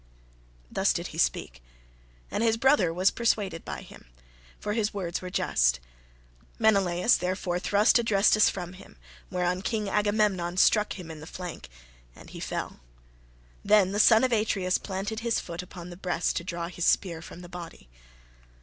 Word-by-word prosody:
Thus - - +2
did - - -4
he - - -6
speak, - - 0 0.7
and - - -1
his 225 -1 +2
brother 245 - +3
was 185 +3 +2
persuaded 205 -7 -1
by - - -6
him, - - -15 0.5
for 210 - -3
his 215 -2 -1
words 180 -3 -3
were 185 - -6
just. 65 - +1 0.8
Menelaus, 195 -2 +3
therefore, 180 -1 -2
thrust 205 +5 +3
Adrestus 215 -2 +4
from 180 -2 -6
him, 185 - -15 0.3
whereon 180 0 -1
King 215 +1 -2
Agamemnon 205 -4 +1
struck 210 +2 +4
him 175 -4 -9
in 160 - -9
the 155 - -10
flank, 180 - -8 0.5
and - - -14
he - - -8
fell: - - -5 0.8
then 200 -2 +4
the 205 - -1
son 220 +2 +6
of 255 - +2
Atreus 200 -4 +1
planted 200 +3 -4
his 230 0 0
foot 170 0 -6
upon 180 -1 -10
his 175 - -10
breast 180 -2 -1
to 170 - -3
draw 170 -1 -4
his 175 -1 -4
spear 170 -4 +1
from 170 +1 -11
the 175 - -10
body. 170 - -10
185 Hz, 165 wpm, -27 LUFS, 175-210 Hz, 0.8 s, son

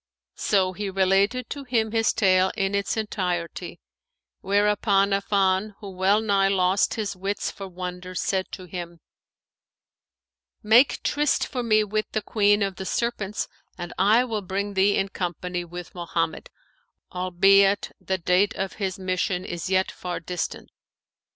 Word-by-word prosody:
So 185 -2 +2
he 200 +1 -4
related 195 +6 +2
to 285 - -5
him 230 -4 0
his 225 0 +2
tale 190 -3 +3
in 195 0 0
its 200 +2 -1
entirety; 180 -6 -3 0.6
whereupon 200 0 +2
Affan, 195 0 +1
who 200 -3 -8
well 190 +3 +2
nigh 200 -3 +2
lost 190 0 +2
his 205 -3 -3
wits 195 +2 -3
for 195 - -8
wonder, 180 0 -7
said 190 +1 -1
to 185 - -7
him, 175 -1 -7 1.6
'Make 235 +5 +4
tryst 295 -1 +1
for 250 - -4
me 215 -2 +3
with 215 +1 -2
the 215 - -1
Queen 205 -1 +3
of 195 -2 -3
the 190 - -5
Serpents 215 -4 -2 0.3
and 175 -1 -6
I 215 +6 +5
will 220 -4 -3
bring 200 +2 -3
thee 195 +1 +3
in 195 - 0
company 180 -1 -3
with 175 0 -9
Mohammed, 165 -2 -3 0.6
albeit 195 +2 +3
the 190 - -2
date 185 +4 +2
of 195 0 -3
his 190 0 -1
mission 185 -1 -1
is 175 +1 -5
yet 190 0 +2
far 180 -1 -5
distant. 175 +1 -5
195 Hz, 145 wpm, -25 LUFS, 185-210 Hz, 1.6 s, I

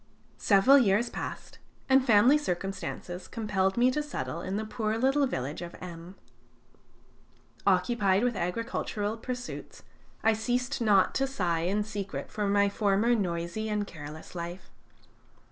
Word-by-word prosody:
Several 220 +8 +6
years 225 0 +2
passed, - - -7 0.3
and 265 0 +5
family 240 +3 +6
circumstances 190 -6 -4
compelled 200 -4 -1
me 250 +2 +4
to 300 - -1
settle 290 - -4
in 190 +2 -3
the 220 - -3
poor 215 0 -2
little 270 +3 +3
village 135 - -4
of 175 0 -7
M. 175 +1 -9 1.5
Occupied 195 +1 +3
with 245 -2 +1
agricultural 210 +2 -2
pursuits, 245 +2 -7 0.4
I 225 - +5
ceased 245 +4 -1
not 205 -4 +4
to 270 - +1
sigh 175 -10 -1
in 205 +4 +1
secret 205 -2 -5
for 210 -1 -1
my 200 0 +3
former 205 +3 +2
noisy 180 +1 -2
and 210 -1 -1
careless 155 -3 -10
life. 175 +1 -7
205 Hz, 135 wpm, -29 LUFS, 185-240 Hz, 1.5 s, Several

